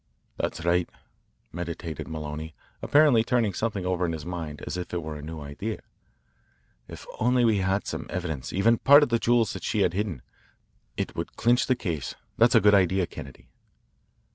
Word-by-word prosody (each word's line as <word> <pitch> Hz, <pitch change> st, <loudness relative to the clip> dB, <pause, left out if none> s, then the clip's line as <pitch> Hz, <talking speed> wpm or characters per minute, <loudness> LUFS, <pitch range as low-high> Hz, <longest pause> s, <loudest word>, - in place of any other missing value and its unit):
"That's 85 Hz, -, -3 dB
right," 85 Hz, 0 st, +2 dB, 0.6 s
meditated 85 Hz, -1 st, -5 dB
Maloney, 80 Hz, 0 st, -6 dB, 0.3 s
apparently 145 Hz, -6 st, +5 dB
turning 115 Hz, -4 st, +1 dB
something 105 Hz, -2 st, -2 dB
over 90 Hz, -1 st, 0 dB
in 85 Hz, -2 st, 0 dB
his 80 Hz, -2 st, -6 dB
mind 80 Hz, -4 st, -6 dB
as -, -, -4 dB
if 90 Hz, 0 st, -5 dB
it 85 Hz, -, -2 dB
were 80 Hz, -1 st, -5 dB
a 75 Hz, -, -7 dB
new 80 Hz, +1 st, -7 dB
idea. 75 Hz, +10 st, -5 dB, 1.1 s
"If -, -, -10 dB
we -, -, -12 dB
only 120 Hz, -2 st, +3 dB
had 95 Hz, +1 st, 0 dB
some -, -, -5 dB
evidence, 80 Hz, -8 st, -4 dB
even 115 Hz, +5 st, +3 dB
part 145 Hz, +2 st, +7 dB
of 145 Hz, -, 0 dB
the 115 Hz, 0 st, +2 dB
jewels 115 Hz, -4 st, +2 dB
that -, -, -7 dB
she -, -, 0 dB
had 85 Hz, -, +2 dB
hidden, 95 Hz, -, -3 dB, 0.7 s
it -, -, -3 dB
would -, -, -5 dB
clinch 120 Hz, +1 st, +3 dB
the 130 Hz, -, +3 dB
case. 80 Hz, -, -4 dB, 0.2 s
That's -, -, +4 dB
a -, -, +7 dB
good 105 Hz, +1 st, +5 dB
idea, 95 Hz, -1 st, +3 dB
Kennedy." 70 Hz, -5 st, -11 dB
90 Hz, 180 wpm, -26 LUFS, 80-115 Hz, 1.1 s, part